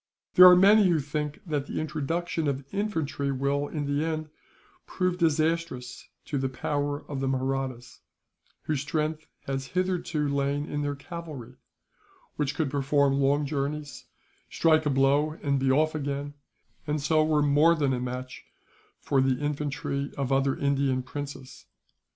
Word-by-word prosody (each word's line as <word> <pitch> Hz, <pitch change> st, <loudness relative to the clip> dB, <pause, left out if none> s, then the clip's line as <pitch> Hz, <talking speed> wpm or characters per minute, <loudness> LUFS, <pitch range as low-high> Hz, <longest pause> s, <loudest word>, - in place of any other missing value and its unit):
There 180 Hz, 0 st, +10 dB
are 180 Hz, -, +8 dB
many 200 Hz, +2 st, +6 dB
who 165 Hz, -3 st, +3 dB
think 150 Hz, +1 st, -4 dB
that 145 Hz, -4 st, -2 dB
the -, -, -3 dB
introduction 155 Hz, +2 st, -2 dB
of 140 Hz, -1 st, -2 dB
infantry 160 Hz, -9 st, -1 dB
will, 140 Hz, +2 st, 0 dB
in 150 Hz, -1 st, -4 dB
the 145 Hz, +1 st, 0 dB
end, 155 Hz, -1 st, -3 dB, 0.6 s
prove 180 Hz, -1 st, -1 dB
disastrous 160 Hz, -5 st, -1 dB, 0.2 s
to 140 Hz, -, -2 dB
the 135 Hz, 0 st, -1 dB
power 145 Hz, +2 st, -2 dB
of 140 Hz, -2 st, -4 dB
the 135 Hz, -, -1 dB
Mahrattas; 130 Hz, -2 st, -3 dB, 0.6 s
whose 150 Hz, -3 st, -1 dB
strength 155 Hz, +1 st, -2 dB, 0.2 s
has 135 Hz, 0 st, -3 dB
hitherto 180 Hz, -5 st, 0 dB
lain 140 Hz, +1 st, 0 dB
in 145 Hz, -1 st, -3 dB
their 145 Hz, 0 st, -2 dB
cavalry, 155 Hz, -5 st, -8 dB, 0.8 s
which 150 Hz, -1 st, -1 dB
could 155 Hz, -5 st, -1 dB
perform 140 Hz, 0 st, +2 dB
long 140 Hz, +2 st, +2 dB
journeys, 145 Hz, +1 st, -4 dB, 0.4 s
strike 155 Hz, -2 st, +3 dB
a -, -, +3 dB
blow 140 Hz, +3 st, +2 dB
and 140 Hz, -2 st, +1 dB
be 135 Hz, 0 st, +1 dB
off 155 Hz, +3 st, +2 dB
again, 145 Hz, -1 st, -3 dB, 0.5 s
and 150 Hz, +1 st, 0 dB
so 155 Hz, +2 st, +2 dB
were 155 Hz, -1 st, +2 dB
more 150 Hz, +4 st, +4 dB
than 140 Hz, -4 st, +1 dB
a 125 Hz, -, -1 dB
match 125 Hz, +1 st, -6 dB, 0.6 s
for 135 Hz, -2 st, +1 dB
the 130 Hz, -1 st, +2 dB
infantry 140 Hz, -1 st, -3 dB
of 135 Hz, -1 st, -2 dB
other 135 Hz, 0 st, +2 dB
Indian 140 Hz, -2 st, +1 dB
princes. 135 Hz, 0 st, -8 dB
145 Hz, 150 wpm, -27 LUFS, 135-155 Hz, 0.8 s, There